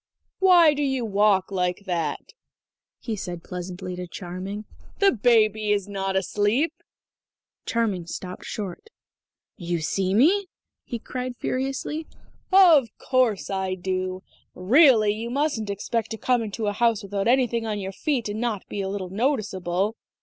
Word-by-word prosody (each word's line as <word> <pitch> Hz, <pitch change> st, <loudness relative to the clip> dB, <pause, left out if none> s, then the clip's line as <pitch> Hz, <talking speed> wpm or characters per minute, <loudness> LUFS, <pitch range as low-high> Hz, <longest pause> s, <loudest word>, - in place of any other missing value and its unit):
"Why 350 Hz, -5 st, +6 dB
do 295 Hz, -, -3 dB
you 265 Hz, -4 st, 0 dB
walk 205 Hz, -2 st, +2 dB
like 180 Hz, +1 st, -1 dB
that?" 175 Hz, -4 st, -3 dB, 0.6 s
he 225 Hz, -, -4 dB
said 175 Hz, -4 st, -6 dB
pleasantly 180 Hz, 0 st, -6 dB
to 180 Hz, 0 st, -5 dB
Charming. 185 Hz, +4 st, -6 dB, 0.3 s
"The 400 Hz, -1 st, +5 dB
baby 215 Hz, -2 st, +3 dB
is 200 Hz, -1 st, +1 dB
not 195 Hz, -1 st, -3 dB
asleep." 210 Hz, -, +1 dB, 0.9 s
Charming 205 Hz, -7 st, -1 dB
stopped 180 Hz, +1 st, -7 dB
short. 205 Hz, -, -6 dB, 0.7 s
"You 175 Hz, -1 st, -2 dB
see 185 Hz, +4 st, 0 dB
me?" 370 Hz, -, +4 dB, 0.4 s
he 240 Hz, -, -4 dB
cried 250 Hz, +2 st, -5 dB
furiously. 270 Hz, +5 st, -3 dB, 0.4 s
"Of 340 Hz, -10 st, +7 dB
course 250 Hz, -7 st, +1 dB
I 190 Hz, -1 st, -1 dB
do! 185 Hz, 0 st, -3 dB, 0.3 s
Really, 220 Hz, -, +5 dB
you 225 Hz, +2 st, -5 dB
mustn't 255 Hz, -5 st, -1 dB
expect 215 Hz, +3 st, -2 dB
to 225 Hz, -, -5 dB
come 250 Hz, +1 st, +1 dB
into 220 Hz, 0 st, -4 dB
a 205 Hz, -, 0 dB
house 225 Hz, 0 st, +1 dB
without 200 Hz, +1 st, -2 dB
anything 240 Hz, -2 st, +2 dB
on 210 Hz, -1 st, -2 dB
your 195 Hz, -1 st, -4 dB
feet 265 Hz, 0 st, -1 dB
and 210 Hz, +2 st, -4 dB
not 225 Hz, -5 st, -2 dB
be 205 Hz, -, -4 dB
a 190 Hz, -, -3 dB
little 190 Hz, -2 st, -4 dB
noticeable. 205 Hz, -4 st, -1 dB
210 Hz, 145 wpm, -25 LUFS, 190-245 Hz, 0.9 s, Of